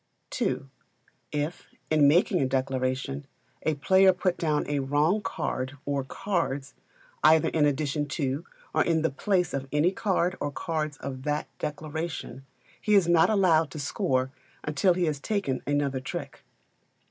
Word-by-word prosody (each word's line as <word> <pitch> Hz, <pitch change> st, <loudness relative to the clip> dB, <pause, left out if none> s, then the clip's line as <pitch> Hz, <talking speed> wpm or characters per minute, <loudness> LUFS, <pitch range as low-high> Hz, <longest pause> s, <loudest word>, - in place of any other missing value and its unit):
ii. -, -, +1 dB, 0.7 s
If, 150 Hz, +3 st, -3 dB, 0.2 s
in 150 Hz, -2 st, +5 dB
making 175 Hz, +4 st, +4 dB
a 135 Hz, -, +2 dB
declaration, 135 Hz, +1 st, -1 dB, 0.3 s
a 155 Hz, -, 0 dB
player 190 Hz, +6 st, +5 dB
put 180 Hz, 0 st, 0 dB
down 155 Hz, -3 st, 0 dB
a 145 Hz, -1 st, 0 dB
wrong 145 Hz, +9 st, +2 dB
card 140 Hz, -8 st, -3 dB
or 140 Hz, -1 st, -1 dB
cards, 140 Hz, -3 st, -2 dB, 0.5 s
either 155 Hz, +1 st, +6 dB
in 150 Hz, -2 st, +3 dB
addition 145 Hz, +1 st, -1 dB
to 140 Hz, 0 st, -2 dB, 0.3 s
or 155 Hz, -, +3 dB
in 160 Hz, -2 st, +1 dB
the 160 Hz, -, +2 dB
place 180 Hz, +3 st, 0 dB
of 135 Hz, -1 st, -3 dB
any 150 Hz, +5 st, +3 dB
card 190 Hz, -2 st, 0 dB
or 145 Hz, -, -2 dB
cards 155 Hz, -1 st, -3 dB
of 130 Hz, -1 st, -6 dB
that 150 Hz, 0 st, -1 dB
declaration, 155 Hz, -2 st, -4 dB, 0.4 s
he 210 Hz, -1 st, +3 dB
is 190 Hz, -4 st, +5 dB
not 170 Hz, -1 st, +5 dB
allowed 175 Hz, -7 st, +4 dB
to 145 Hz, -, -8 dB
score 130 Hz, -2 st, 0 dB, 0.3 s
until 150 Hz, +5 st, +2 dB
he 180 Hz, -1 st, +1 dB
has 150 Hz, -3 st, -1 dB
taken 195 Hz, -, -1 dB
another 145 Hz, -2 st, 0 dB
trick. 130 Hz, -, -6 dB
150 Hz, 150 wpm, -27 LUFS, 140-170 Hz, 0.7 s, either